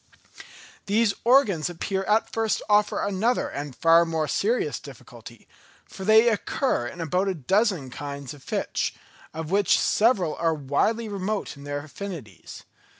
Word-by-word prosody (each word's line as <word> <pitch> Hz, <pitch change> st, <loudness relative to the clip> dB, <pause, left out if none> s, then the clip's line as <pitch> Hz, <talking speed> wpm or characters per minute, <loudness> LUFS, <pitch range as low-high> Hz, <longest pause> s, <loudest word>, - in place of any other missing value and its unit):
These 210 Hz, +1 st, +2 dB
organs 230 Hz, -, +3 dB
appear 190 Hz, +3 st, -3 dB
at 215 Hz, +1 st, +2 dB
first 225 Hz, -1 st, +1 dB
to -, -, -9 dB
offer 210 Hz, 0 st, +2 dB
another 205 Hz, +5 st, 0 dB
and 145 Hz, -2 st, -6 dB
far 165 Hz, +3 st, +5 dB
more 160 Hz, -2 st, -1 dB
serious 460 Hz, -, 0 dB
difficulty; -, -, -13 dB, 0.4 s
for 190 Hz, -, -10 dB
they 220 Hz, +3 st, +6 dB
occur 220 Hz, -, -1 dB
in 170 Hz, -, -9 dB
about 180 Hz, +4 st, 0 dB
a 190 Hz, -, -1 dB
dozen 180 Hz, -, 0 dB
kinds 140 Hz, +1 st, -7 dB
of 145 Hz, -, -14 dB
fish, -, -, -2 dB, 0.4 s
of 160 Hz, +1 st, -6 dB
which 200 Hz, 0 st, +3 dB
several 205 Hz, -8 st, +2 dB
are 165 Hz, -1 st, +1 dB
widely 155 Hz, -, 0 dB
remote 200 Hz, -1 st, -3 dB
in 140 Hz, 0 st, -12 dB
their 145 Hz, 0 st, -4 dB
affinities. 155 Hz, -, -9 dB
185 Hz, 150 wpm, -25 LUFS, 150-215 Hz, 0.4 s, they